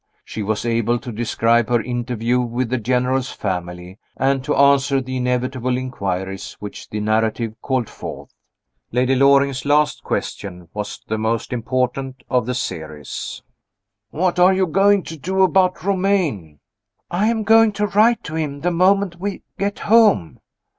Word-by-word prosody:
She 110 - -6
was 105 +2 -2
able 115 0 +1
to 120 +1 -7
describe 115 0 +1
her 120 -1 +3
interview 120 0 -1
with 120 0 -2
the 130 - +1
General's 125 +2 0
family, 90 -1 -5 0.2
and 135 0 +1
to 150 - 0
answer 140 0 +4
the 130 0 -4
inevitable 125 0 -1
inquiries 95 -7 -4
which 105 -1 -9
the 105 - -4
narrative 110 +1 0
called 130 -4 -1
forth. - - -9 0.6
Lady 125 +2 +2
Loring's 140 0 +3
last 150 +1 +2
question 90 -4 -4
was 105 -1 -5
the 110 0 -2
most 115 +2 -1
important 130 +2 -2
of 125 -3 +1
the 125 - -1
series: 80 - -5 0.7
"What 180 +5 0
are 185 +2 +6
you 190 0 +2
going 195 +3 +3
to 160 - -8
do 190 +6 +1
about 185 -2 +2
Romayne?" 180 - 0 0.5
"I 195 +5 +1
am 225 -1 0
going 225 +1 +5
to 210 +1 0
write 215 +3 +3
to 160 - -7
him 150 -3 -3
the 175 - +1
moment 185 0 +2
we 200 +1 -4 0.2
get 200 +1 -1
home." 210 - +3
130 Hz, 155 wpm, -20 LUFS, 115-175 Hz, 0.7 s, are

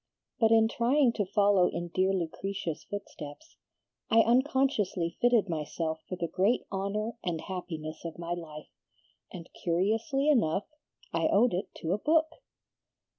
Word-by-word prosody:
But 225 -3 +5
in 225 0 +5
trying 240 +2 +2
to 205 -5 -1
follow 200 -2 +4
in 175 0 -4
dear 185 +2 +1
Lucretia's 185 -1 -3
footsteps, 200 - -8 0.5
I 225 0 +6
unconsciously 235 - +1
fitted 240 -4 +4
myself 160 0 -3
for 185 - -3
the 175 -1 -2
great 195 +8 +1
honor 210 +4 -3
and 170 -3 -2
happiness 160 -4 -6
of 165 -1 -6
my 170 0 -3
life, 155 -3 -8 0.6
and 170 -3 -9
curiously 220 - 0
enough 205 - +2 0.5
I 165 -1 +2
owed 225 +2 +3
it 180 - -2
to 165 - -2
a 205 - -1
book." 315 +4 +2
195 Hz, 140 wpm, -29 LUFS, 170-230 Hz, 0.6 s, I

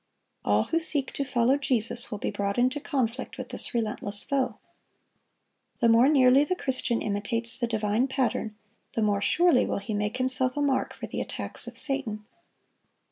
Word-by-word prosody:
All 105 +1 +2
who 330 - 0
seek 290 -4 +2
to 280 - -2
follow 250 0 +2
Jesus 240 -4 -1
will 210 - -4
be - - -3
brought 200 -1 -2
into 255 +4 +2
conflict 260 -4 -3
with - - -7
this - - -4
relentless 210 -3 +1
foe. 270 -2 -1 1.2
The 235 - +3
more 235 +4 +6
nearly 270 -1 +5
the 330 +5 -1
Christian 255 -6 -1
imitates 230 +4 -1
the 240 - 0
divine 220 +2 0
Pattern, 245 -5 -1 0.4
the 225 - 0
more 205 -1 +1
surely 345 +1 +4
will - - -1
he 200 +2 -5
make 210 +3 -2
himself 255 +1 +1
a - - 0
mark 270 -2 0
for - - -6
the - - -4
attacks - - -5
of - - -8
Satan. 240 -7 -2
245 Hz, 175 wpm, -27 LUFS, 215-270 Hz, 1.2 s, more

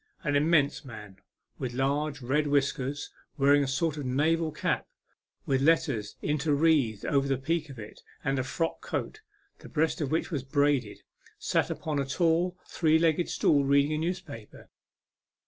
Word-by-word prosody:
An 145 -3 0
immense 150 -1 +2
man, 105 -7 -10 0.4
with 125 -2 -4
large, 140 +1 -1
red 145 +5 +1
whiskers, 140 0 -1 0.3
wear 140 0 +4
ing 145 0 +4
a - - -2
sort 150 +3 -1
of 145 - -4
naval 155 +5 +1
cap - - -2 0.6
with 135 -1 +1
letters 145 -9 +1
interwreathed 145 -6 +1
over 140 -1 +1
the 135 -1 +1
peak 155 +3 -2
of 135 - -10
it, 105 -1 -10 0.2
and 135 0 0
a - - 0
frock 165 +5 -2
coat, - - -4 0.4
the - - -12
breast 160 +3 0
of 145 - -1
which 160 +5 -1
was 145 -5 -1
braided, 135 -4 0 0.3
sat - - 0
upon 150 -2 -3
a 140 - 0
tall, 170 +4 +1
three 160 -2 +2
legged 165 +1 +1
stool 145 -2 +2
reading 140 +2 +3
a - - 0
newspaper. 160 - -6
145 Hz, 165 wpm, -28 LUFS, 135-160 Hz, 0.6 s, wear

